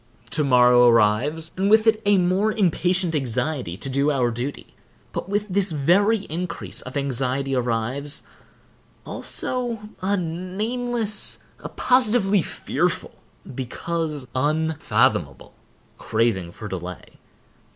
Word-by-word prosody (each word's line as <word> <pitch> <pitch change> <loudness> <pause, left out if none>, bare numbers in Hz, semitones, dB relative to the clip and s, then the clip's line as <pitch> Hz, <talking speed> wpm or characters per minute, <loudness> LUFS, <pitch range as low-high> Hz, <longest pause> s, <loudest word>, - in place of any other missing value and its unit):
To 150 - +1
morrow 125 -2 +6
arrives, 120 +9 +2
and 195 +2 +1
with 220 +1 +5
it 220 -1 +3
a 205 -1 +5
more 185 +4 +2
impatient 185 -3 +1
anxiety 130 - -2
to 125 - -3
do 140 +2 +1
our 130 -5 +1
duty, 125 +5 -6 0.4
but - - -5
with 205 +1 -1
this 195 -1 +1
very 190 +9 +3
increase 170 +2 -4
of 130 +2 -6
anxiety 135 0 -1
arrives, 125 +4 -1 0.8
also, 235 -4 -2
a 200 +2 +1
nameless, 210 +6 -2 0.2
a - - -7
positively 220 -6 +2
fearful, - - -2 0.4
because 150 +2 -4
unfathomable, 155 +3 0 0.5
craving 110 -6 0
for 105 - -8
delay. 90 -2 -8
160 Hz, 110 wpm, -23 LUFS, 125-200 Hz, 0.8 s, morrow